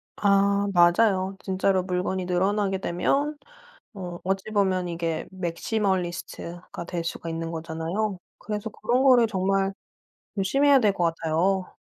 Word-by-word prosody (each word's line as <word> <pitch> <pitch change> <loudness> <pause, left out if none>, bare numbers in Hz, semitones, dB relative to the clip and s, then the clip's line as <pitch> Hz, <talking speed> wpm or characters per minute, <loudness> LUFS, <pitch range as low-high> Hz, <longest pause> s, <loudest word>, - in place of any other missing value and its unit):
아 200 0 +3
맞아요. 185 +2 +4
진짜로 190 0 +1
물건이 180 0 -2
늘어나게 190 +2 +1
되면 285 - 0 0.6
어 180 -3 -6
어찌 195 +3 -2
보면 190 -4 +1
이게 165 -1 -3
맥시멀리스트가 180 -2 -3
될 170 -2 -3
수가 165 0 -5
있는 165 0 -3
거잖아요. 165 +5 -3 0.2
그래서 210 +1 -4
그런 240 +5 0
거를 250 -3 +6
정말 195 0 0 0.6
조심해야 275 +8 +4
될 210 -3 +3
것 175 - 0
같아요. 180 +4 0
190 Hz, 290 characters per minute, -25 LUFS, 175-205 Hz, 0.6 s, 거를